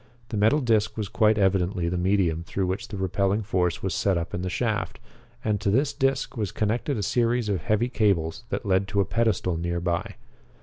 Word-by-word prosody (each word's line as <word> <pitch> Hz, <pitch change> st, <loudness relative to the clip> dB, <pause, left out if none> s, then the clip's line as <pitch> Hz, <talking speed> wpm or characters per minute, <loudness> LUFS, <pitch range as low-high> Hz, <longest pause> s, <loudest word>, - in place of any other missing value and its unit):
The 115 Hz, -, -4 dB
metal 110 Hz, +9 st, +3 dB
disc 110 Hz, -4 st, +1 dB
was 105 Hz, -2 st, -2 dB
quite 110 Hz, -1 st, +3 dB
evidently 95 Hz, -2 st, +1 dB
the 85 Hz, -, -1 dB
medium 90 Hz, -3 st, +1 dB
through 95 Hz, +2 st, -2 dB
which 95 Hz, +2 st, -3 dB
the 100 Hz, -, -6 dB
repelling 100 Hz, +2 st, 0 dB
force 90 Hz, -4 st, 0 dB
was 95 Hz, -3 st, -1 dB
set 95 Hz, +1 st, +1 dB
up 85 Hz, 0 st, -4 dB
in 90 Hz, -, -2 dB
the 90 Hz, -, -2 dB
shaft, -, -, -2 dB, 0.5 s
and 105 Hz, -2 st, 0 dB
to 100 Hz, -, +1 dB
this 135 Hz, +7 st, +2 dB
disc 135 Hz, 0 st, 0 dB
was 105 Hz, -5 st, -2 dB
connected 115 Hz, +6 st, -1 dB
a 105 Hz, -, -2 dB
series 120 Hz, +1 st, +1 dB
of 100 Hz, -3 st, 0 dB
heavy 110 Hz, +1 st, +1 dB
cables 100 Hz, -4 st, 0 dB
that 125 Hz, -, -3 dB
led 95 Hz, 0 st, +2 dB
to 100 Hz, +1 st, -1 dB
a -, -, +1 dB
pedestal 110 Hz, -7 st, 0 dB
nearby. 85 Hz, 0 st, -2 dB
100 Hz, 205 wpm, -25 LUFS, 90-110 Hz, 0.5 s, metal